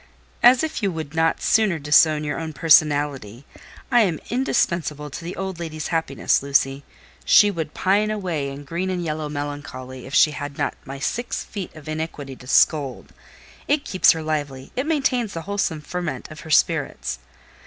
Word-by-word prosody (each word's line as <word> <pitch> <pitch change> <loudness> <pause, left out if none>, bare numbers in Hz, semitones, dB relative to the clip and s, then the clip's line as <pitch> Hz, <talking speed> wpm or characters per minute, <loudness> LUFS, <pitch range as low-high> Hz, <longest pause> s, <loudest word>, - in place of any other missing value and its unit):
"As 245 +4 +6
if 315 -6 -3
you 200 -3 +1
could 160 -3 -6
not 160 0 +1
sooner 215 -6 +3
disown 150 +1 +4
your 150 0 -3
own 160 -1 -5
personality! 145 -6 +2 0.5
I 240 -1 +6
am 175 -7 +1
indispensable 170 - 0
to 165 - -7
the 175 +2 -6
old 190 -2 -5
lady's 155 -2 -5
happiness, 160 -5 +1
Lucy. 140 0 +1 0.4
She 205 -1 +6
would 160 -5 -5
pine 205 +3 +2
away 180 -9 -2
in 140 +1 -8
green 170 +6 -3
and 180 -2 -2
yellow 155 -2 -3
melancholy 145 -3 -6
if 135 - -5
she 155 - +6
had 145 -1 -6
not - - -1
my 135 +1 -7
six 235 - -3
feet 195 -6 -7
of 155 -1 -12
iniquity 155 -3 -5
to 125 - -14
scold. 140 -1 +2 0.5
It 290 0 +1
keeps 185 - +5
her 160 -1 -5
lively—it 150 - -3
maintains 260 -8 0
the 165 - -3
wholesome 195 -5 -2
ferment 175 0 -5
of 155 - -10
her 160 - -10
spirits." 65 - +1
155 Hz, 170 wpm, -22 LUFS, 145-190 Hz, 0.5 s, As